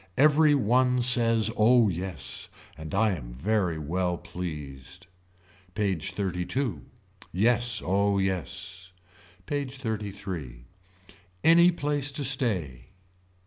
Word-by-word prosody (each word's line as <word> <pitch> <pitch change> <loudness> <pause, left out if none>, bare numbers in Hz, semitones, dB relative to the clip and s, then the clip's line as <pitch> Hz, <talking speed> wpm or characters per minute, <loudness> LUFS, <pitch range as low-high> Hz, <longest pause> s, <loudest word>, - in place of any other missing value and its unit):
Every 150 +1 +5
one 125 0 +2
says 115 -3 +3
oh 115 +1 +5
yes. 95 0 -4 0.3
And 80 +4 -7
I 110 +1 +3
am 65 -10 -6
very 90 - -1
well 90 +3 -2
pleased. 75 -1 -8 0.7
PAGE 95 -7 -1
XXXII. 95 - -2 0.5
Yes 120 +5 +2
oh 100 +2 +1
yes. 95 0 -3 0.5
PAGE 140 +2 -4
XXXIII. 100 - -5 0.8
Any 170 +2 +6
place 145 -3 -2
to 145 - 0
stay. 95 - -1
100 Hz, 100 wpm, -27 LUFS, 90-125 Hz, 0.8 s, Any